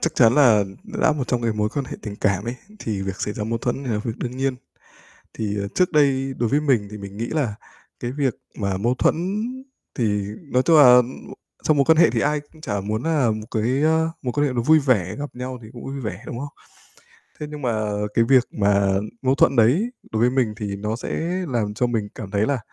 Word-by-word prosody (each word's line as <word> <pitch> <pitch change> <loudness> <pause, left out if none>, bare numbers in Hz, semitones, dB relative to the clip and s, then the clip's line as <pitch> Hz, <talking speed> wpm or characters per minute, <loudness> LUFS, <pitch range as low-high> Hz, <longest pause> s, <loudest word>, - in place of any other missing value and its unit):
chắc 165 - -1
chắn 120 -1 +5
là 115 -8 +5 0.2
đã 215 -7 +1
một 140 -4 -3
trong 120 -1 0
cái 115 -1 +1
mối 105 0 0
quan 140 +3 -3
hệ - - -7
tình 105 -2 -6
cảm 100 -1 0
ấy, 120 - -3 0.2
thì 100 -4 -3
việc 95 0 -5
xảy 105 - -2
ra 105 - -3
mâu 115 +1 -2
thuẫn 130 +3 -2
là 110 -4 -1
việc 115 - -2
đương 125 0 -4
nhiên. 135 0 0 0.8
Thì 105 -2 -3 0.2
trước 180 -1 +2
đây 135 -3 +2
đối 120 -2 0
với 145 - +2
mình 125 -9 +2
thì 105 - -7
mình 100 0 -9
nghĩ 115 - -2
là 135 -10 -1 0.4
cái 120 - -3
việc 135 -3 0 0.2
mà 100 -2 -1
mâu 120 +5 +1
thuẫn - - +2 0.8
thì 105 -4 +1 0.3
nói 125 +1 +3
tung 165 -2 +5
là 125 -3 +9
m 120 - -5 0.6
trong 155 -2 +3
mối 140 - +5
quan 160 -1 +5
hệ 170 - +6
thì 115 0 -1
ai 150 0 +1
cũng 155 -1 -18
chả 100 -8 -2
muốn, 110 +4 -3
à, 150 -8 +2
một 110 0 -4
cái, 125 +5 0
ơ, 160 +1 +3
mối 125 -3 -2
quan 145 0 +2
hệ 130 - -3
nó 120 - 0
vui 155 +5 +5
vẻ, 110 - +1
gặp 145 -3 -6
nhau 125 0 -5
thì - - -10
cũng 120 - -10
vui 135 +1 -5
vẻ, 105 -4 -5
đúng 120 - -6
không? 145 - -4 0.9
Thế 150 - -4
nhưng 150 -1 -7
mà 110 -4 0 0.3
cái 115 - +3
việc 130 -1 +5
mà 100 -1 +2 0.3
mâu 130 0 +2
thuẫn 140 - +4
đấy 145 - +3 0.2
đối 110 - -1
với 120 - +5
mình 125 -4 +1
thì 100 -3 -4
nó 105 +2 -3
sẽ 120 - -6 0.4
làm 110 -5 -1
cho 125 +4 0
mình 115 -4 -1
cảm 100 -2 -7
thấy 100 +1 +2
là 140 0 0
120 Hz, 240 wpm, -22 LUFS, 105-140 Hz, 0.9 s, là